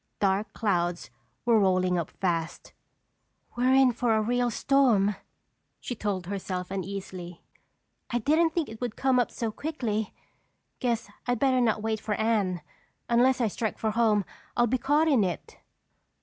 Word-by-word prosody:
Dark 200 +1 +1
clouds 175 - -1 0.3
were 230 -2 +5
rolling 185 -2 +2
up 165 - -3
fast. 170 -3 -3 0.8
"We're 255 +2 +3
in 265 -2 +6
for 230 -1 +1
a 220 - +2
real 245 +2 +1
storm," 230 -6 +3 0.6
she - - -5
told 205 -5 -3
herself 185 -1 -4
uneasily. 190 -2 -6 0.7
"I 240 - 0
didn't 310 +8 +3
think 320 -1 -1
it 220 +1 -10
would 240 -3 -3
come 265 -2 +2
up 245 - +1
so 230 -2 -3
quickly. 220 -7 -3 0.7
Guess 235 -3 -1 0.2
I'd 245 0 +1
better 260 0 +2
not 220 -3 +1
wait 220 -1 -1
for 215 -1 -2
Anne. 205 -6 0 0.5
Unless 250 +2 +3
I 235 - +3
strike 220 +1 -3
for 220 - -1
home, 215 -3 +2 0.3
I'll 240 - +5
be 250 +2 0
caught 290 +5 +2
in 265 -9 +4
it." 180 -3 -4
220 Hz, 155 wpm, -27 LUFS, 195-245 Hz, 0.8 s, in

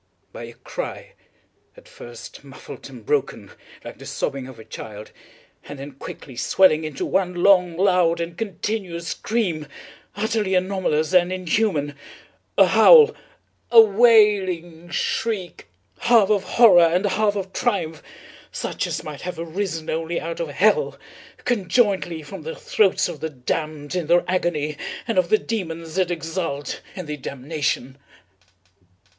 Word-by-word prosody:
—by - - -7
a - - -11
cry, - - -7 0.6
at - - -16
first - - -11
muffled - - -11
and - - -12
broken, 440 0 -2 0.3
like - - -9
the - - -11
sobbing 135 -2 -3
of 130 -3 -12
a 110 - -12
child, 105 -1 -9 0.5
and 145 - -8
then 140 +2 -8
quickly 135 -1 -10
swelling 155 +6 +3
into 155 -3 -4
one 185 -2 0
long, 180 -2 +4
loud, 180 -3 +3
and 170 0 -4
continuous 190 -3 -4
scream, 180 -10 -2 0.5
utterly 210 -2 0
anomalous 185 -4 0
and 180 0 +4
inhuman—a 165 -6 -1
howl—a 465 - +4
wailing 200 -7 +4
shriek, 195 +1 -3 0.3
half 225 -4 +4
of 205 -2 +1
horror 225 -7 +6
and 170 +4 +3
half 205 +1 +1
of 195 -1 -5
triumph, 165 -10 -1 0.5
such - - -3
as - - -4
might 150 -2 -8
have 180 -1 -5
arisen 165 -1 -4
only 165 +1 -2
out 165 0 -5
of 170 - -2
hell, 215 - +2 0.5
conjointly 195 -6 +1
from 185 +4 -9
the 160 +1 -6
throats 200 -3 +1
of 170 -4 -7
the 160 - -3
damned 150 +2 -4
in 180 -4 -2
their 175 +1 +3
agony 155 -5 -1 0.3
and 225 -5 +2
of 175 -2 0
the 215 - +5
demons 165 -8 -5
that 185 -2 +1
exult 165 -3 -4
in 185 -3 -6
the 150 -1 -5
damnation. 140 -1 -3
175 Hz, 140 wpm, -22 LUFS, 160-205 Hz, 0.6 s, horror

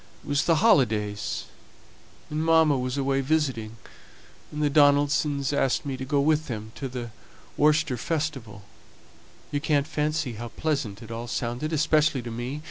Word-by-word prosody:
It - - -17
was 145 0 +1
the 165 - +4
holidays, 105 - +2 0.9
and 155 +1 -1
mamma 160 -2 +4
was 130 +1 -2
away 135 0 +1
visiting, 130 -7 -1 0.7
and 150 0 -3
the - - +4
Donaldsons 145 -1 +3
asked 135 0 +1
me 135 -2 -3
to 130 - -6
go 140 +1 +1
with 155 +2 +2
them 110 -3 -6
to 135 - -4
the 120 -2 -6 0.4
Worcester 150 -3 +2
Festival. 135 -8 -3 0.9
You 145 - -1
can't 145 -2 +1
fancy 150 -3 -1
how 120 +2 -6
pleasant 125 -7 -3
it 115 - -10
all 115 +1 -5
sounded, 120 +6 -3
especially 155 -3 +2
to 120 - -6
me. 120 +5 -4
140 Hz, 155 wpm, -26 LUFS, 120-150 Hz, 0.9 s, the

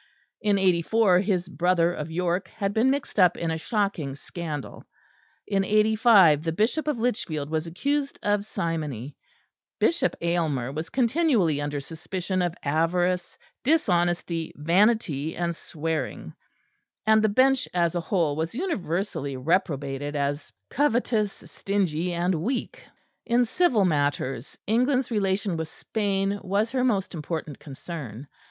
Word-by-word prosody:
In 205 -2 +2
'84 185 +1 +3
his 185 -2 0
brother 175 +1 +2
of 150 -2 -5
York 175 +2 -1
had 200 -2 -3
been 225 +5 +3
mixed 275 -5 -2
up 180 -2 +5
in 165 -1 -2
a 160 - -1
shocking 195 - -1
scandal; 150 -1 -6 0.6
in 195 -1 +1
'85 210 -6 +5
the 165 - -1
Bishop 220 - 0
of 300 -4 0
Lichfield 160 -11 -2
was 160 +1 -1
accused 280 - -1
of 205 0 +1
simony; 150 - -4 0.6
Bishop 335 - +2
Aylmer 160 -7 0
was 155 +3 -5
continually 235 - +2
under 145 0 -2
suspicion 180 +5 -4
of 175 -1 -1
avarice, 175 +4 0 0.3
dishonesty, 175 - +1
vanity 170 -2 +2
and 170 -1 -1
swearing; 160 0 -4 0.7
and 220 0 +5
the 215 - +3
Bench 260 +4 +3
as 170 -2 +1
a 175 - -1
whole 165 -4 0
was 160 +7 -3
universally 190 - -2
reprobated 145 -2 -1
as 145 +1 -2 0.2
covetous, 240 -6 +1
stingy 180 -4 -1
and 175 +2 0
weak. 260 - -3 0.5
In 240 +1 +3
civil 245 - +2
matters, 145 -5 -1
England's 250 +4 +1
relation 195 -3 0
with 160 0 -3
Spain 200 +2 -1
was 205 +4 0
her 255 -1 0
most 205 -7 0
important 155 -2 -5
concern. 135 - -8
180 Hz, 130 wpm, -26 LUFS, 160-215 Hz, 0.7 s, up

